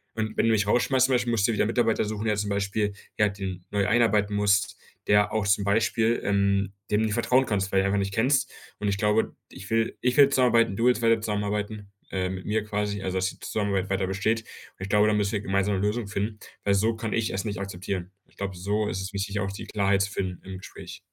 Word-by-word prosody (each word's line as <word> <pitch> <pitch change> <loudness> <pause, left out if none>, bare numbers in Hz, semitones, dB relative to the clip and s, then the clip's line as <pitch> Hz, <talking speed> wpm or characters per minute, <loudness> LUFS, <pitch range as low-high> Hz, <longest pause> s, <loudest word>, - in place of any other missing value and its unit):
Und 110 -1 -3
wenn - - +3
du - - +4
mich 105 -2 +2
rausschmeißt, 130 +4 +3
zum 135 - 0
Beispiel, 120 -1 0
musst 110 -4 +2
du - - +1
dir - - -1
wieder - - +3
Mitarbeiter 115 -1 +1
suchen, 105 +1 -4
der 110 -1 +2
zum 105 -1 -2
Beispiel, 100 +1 -1 0.2
ja 105 -1 +4
den 95 -3 -6
neu 100 -2 +1
einarbeiten 105 -3 +2
musst, 100 -3 +2 0.3
der 105 0 +4
auch 110 -2 0
zum 100 0 +3
Beispiel, 110 +3 +2
ähm, 100 -1 +1 0.2
dem 105 - +3
du - - +2
nicht 110 - -1
vertrauen 125 +4 +3
kannst, 100 -4 -1
weil 95 - +3
du 95 - +2
einfach 100 +1 +1
nicht 100 0 -2
kennst. 130 +5 +2 0.3
Und 105 - 0
ich 100 - 0
glaube, 105 +2 +1
ich 95 - -10
will 115 0 0
ich 125 0 +1
will 140 -1 +8
zusammenarbeiten, 120 -6 +3
du 115 - 0
willst 125 -2 +3
weiter 115 -1 +3
zusammenarbeiten 105 -1 -3 0.2
äh, 95 -1 -1
mit 95 0 -6
mir 110 0 0
quasi 105 -1 -2
also 95 0 -2
dass 95 0 +1
die - - -18
Zusammenarbeit 100 -3 -1
weiter 95 0 0
besteht. 100 +4 0
Und 110 - -16
ich 95 - -5
glaube, 105 +1 +4
da 105 - +3
müssen 105 -1 +1
wir 105 - -1
gemeinsame 100 0 0
'ne 100 - 0
Lösung 110 0 -2
finden, 105 +1 -3 0.3
weil 100 -1 +2
so 110 +3 +2
kann 110 0 -4
ich 115 -1 0
es 95 - -2
nicht 105 -2 -3
akzeptieren.“ 95 -1 -4 0.2
Ich - - -29
glaube, 100 -1 -4
so 105 +3 -1
ist 95 - -3
es 95 +1 -6
wichtig, 100 +1 -2
auch 100 -1 -2
die 100 +2 -7
Klarheit 100 -2 +1
zu 100 - -3
finden 95 -4 -3
im 95 0 -7
Gespräch. - - -10
105 Hz, 250 wpm, -26 LUFS, 100-110 Hz, 0.3 s, will